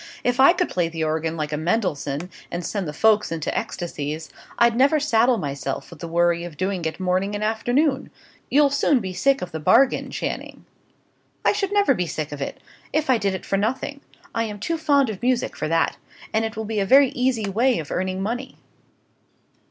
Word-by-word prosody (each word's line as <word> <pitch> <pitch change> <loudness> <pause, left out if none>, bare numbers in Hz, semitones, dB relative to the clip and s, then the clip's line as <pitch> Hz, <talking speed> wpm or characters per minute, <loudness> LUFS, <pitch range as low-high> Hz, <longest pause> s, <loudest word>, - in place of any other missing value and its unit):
If 245 +1 0
I 275 +6 +8
could 360 -1 0
play 175 -2 -1
the 165 -1 -3
organ 160 +1 -1
like 155 -1 -3
a - - 0
Mendelssohn, 160 -3 -1 0.2
and 175 0 -4
send 200 -5 -3
the - - -3
folks 210 +4 +3
into 160 -2 -3
ecstasies, 155 -3 -4 0.3
I'd 235 -1 +4
never 280 +5 +4
saddle 245 -3 +3
myself 140 -3 -4
with 170 - -12
the 170 - -6
worry 170 0 +2
of 170 -4 -8
doing 185 -1 -2
it 160 - -3
morning 185 +2 0
and 205 - -3
afternoon. 250 +6 +1 0.4
You'll 285 0 +4
soon 285 -1 +3
be 190 -4 -5
sick 275 +3 +2
of 180 - -6
the 160 - -4
bargain, 245 - +3
Channing." - - -5 0.8
"I - - +6
should 405 -1 -1
never 405 -8 +4
be 180 -7 -2
sick 155 -2 -4
of 145 -1 -6
it, - - -4 0.3
if 310 -3 +1
I 245 - +3
did 200 -2 0
it - - -7
for 195 - 0
nothing: 260 +7 -2 0.3
I 230 0 0
am 210 -2 -6
too 330 +10 -2
fond 285 -6 +3
of 200 - -8
music 250 0 0
for 155 - -3
that. 165 +1 +1 0.4
And 220 +1 +2
it 220 0 -5
will 220 - -3
be 215 0 -2
a 195 - +1
very 275 +3 +7
easy 250 -4 0
way 235 +6 +2
of 155 - -6
earning 185 +1 -2
money." 245 +5 -4
210 Hz, 205 wpm, -23 LUFS, 170-255 Hz, 0.8 s, I